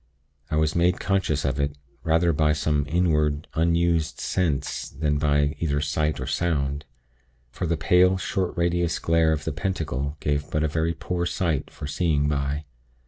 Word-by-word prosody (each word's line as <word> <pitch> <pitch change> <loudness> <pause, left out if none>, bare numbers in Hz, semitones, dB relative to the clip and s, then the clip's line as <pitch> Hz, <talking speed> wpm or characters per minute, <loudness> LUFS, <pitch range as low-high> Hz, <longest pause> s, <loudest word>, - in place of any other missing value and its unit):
I 75 - -1
was 80 0 +1
made 90 +1 +2
conscious 95 -8 0
of 70 +1 -1
it, 70 +1 -1 0.3
rather 85 +1 +3
by 75 0 +3
some 75 -1 0
inward, 75 -3 +1
unused 85 -1 +1
sense 75 -6 -1
than 75 0 -1
by 75 0 +2
either 75 -3 0
sight 75 +1 -1
or - - -3
sound; 75 -4 -1 0.7
for 85 - -3
the 85 0 0
pale, 90 +3 +4
short 95 -1 -2
radius 85 -1 +1
glare 80 -1 +2
of 75 -1 -2
the 80 - -2
Pentacle 75 -5 -3
gave 75 -1 -1
but 75 0 0
a - - +2
very 80 +2 -1
poor 85 +2 -2
light 80 -7 0
for - - -8
seeing 75 0 +1
by. 75 +1 -1
80 Hz, 165 wpm, -25 LUFS, 75-85 Hz, 0.7 s, pale